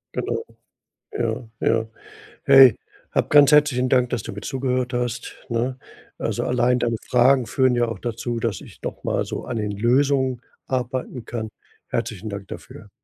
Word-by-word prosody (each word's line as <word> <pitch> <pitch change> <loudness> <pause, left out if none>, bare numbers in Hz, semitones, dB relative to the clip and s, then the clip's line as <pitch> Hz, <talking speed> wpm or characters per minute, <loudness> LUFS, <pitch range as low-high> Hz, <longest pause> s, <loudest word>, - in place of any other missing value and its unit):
Genau. 455 - -2 0.7
Ja, 130 - -2
ja. 115 -1 +1 0.6
Hey, 135 -4 +8 0.4
hab - - 0
ganz 145 -1 +7
herzlichen 145 -4 +4
Dank, 125 -1 +3
dass 120 -4 -2
du - - -6
mir 105 - -7
zugehört 130 -1 -2
hast, 120 -1 -3
ne? 120 +3 -1 0.4
Also, - - -2
allein 125 0 +2
deine 115 -1 0
Fragen 125 0 +4
führen 130 0 +2
ja 120 -1 +2
auch 115 - -5
dazu, 120 0 -3
dass 110 -6 -2
ich - - -14
noch - - -6
mal - - 0
so - - -5
an 115 - -4
den 105 -1 -2
Lösungen 130 +3 +1 0.2
arbeiten 125 -1 -3
kann. 110 -3 -4 0.4
Herzlichen 110 -2 -3
Dank 100 -1 -7
dafür. - - -10
125 Hz, 160 wpm, -23 LUFS, 115-130 Hz, 0.7 s, Hey